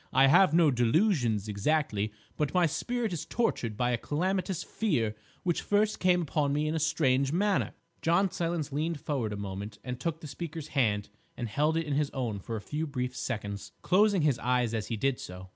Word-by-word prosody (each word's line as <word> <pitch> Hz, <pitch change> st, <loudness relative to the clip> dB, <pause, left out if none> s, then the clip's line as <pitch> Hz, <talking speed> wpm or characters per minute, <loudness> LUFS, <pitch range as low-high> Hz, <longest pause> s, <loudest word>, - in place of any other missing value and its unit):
I 135 Hz, +1 st, +6 dB
have 165 Hz, +6 st, +6 dB
no 165 Hz, -2 st, +5 dB
delusions 120 Hz, -, +2 dB
exactly, 105 Hz, -1 st, 0 dB, 0.2 s
but 150 Hz, +3 st, -1 dB
my 180 Hz, -1 st, +5 dB
spirit 225 Hz, +7 st, -1 dB
is 160 Hz, -2 st, -3 dB
tortured 125 Hz, -, -1 dB
by 125 Hz, 0 st, +1 dB
a 120 Hz, -, 0 dB
calamitous 185 Hz, -, -1 dB
fear 125 Hz, -, 0 dB, 0.3 s
which 175 Hz, -2 st, 0 dB
first 210 Hz, +1 st, +1 dB
came 180 Hz, -1 st, +3 dB
upon 145 Hz, -2 st, 0 dB
me 150 Hz, +1 st, +1 dB
in 155 Hz, -, 0 dB
a 160 Hz, -, 0 dB
strange 140 Hz, -3 st, +2 dB
manner." 195 Hz, +4 st, +1 dB, 0.3 s
John 175 Hz, +3 st, +3 dB
Silence 165 Hz, -3 st, -2 dB
leaned 155 Hz, +2 st, -1 dB
forward 135 Hz, -8 st, -2 dB
a 105 Hz, -, -4 dB
moment 100 Hz, +1 st, -5 dB
and 125 Hz, -1 st, -5 dB
took 160 Hz, +4 st, -2 dB
the 160 Hz, -, -10 dB
speaker's 155 Hz, +1 st, -6 dB
hand 105 Hz, -7 st, +1 dB, 0.3 s
and 120 Hz, -, -3 dB
held 150 Hz, +8 st, +1 dB
it 165 Hz, -, 0 dB
in 150 Hz, -, -2 dB
his 145 Hz, 0 st, +1 dB
own 115 Hz, -6 st, -2 dB
for 115 Hz, +4 st, -5 dB
a 110 Hz, -, -4 dB
few 155 Hz, +8 st, -3 dB
brief 125 Hz, -3 st, -3 dB
seconds, 100 Hz, -5 st, -4 dB
closing 200 Hz, -2 st, +4 dB
his 140 Hz, -6 st, +2 dB
eyes 125 Hz, -2 st, +1 dB
as 110 Hz, -2 st, -2 dB
he 115 Hz, -, -2 dB
did 135 Hz, +3 st, 0 dB
so. 90 Hz, +1 st, -8 dB
145 Hz, 200 wpm, -29 LUFS, 115-170 Hz, 0.3 s, I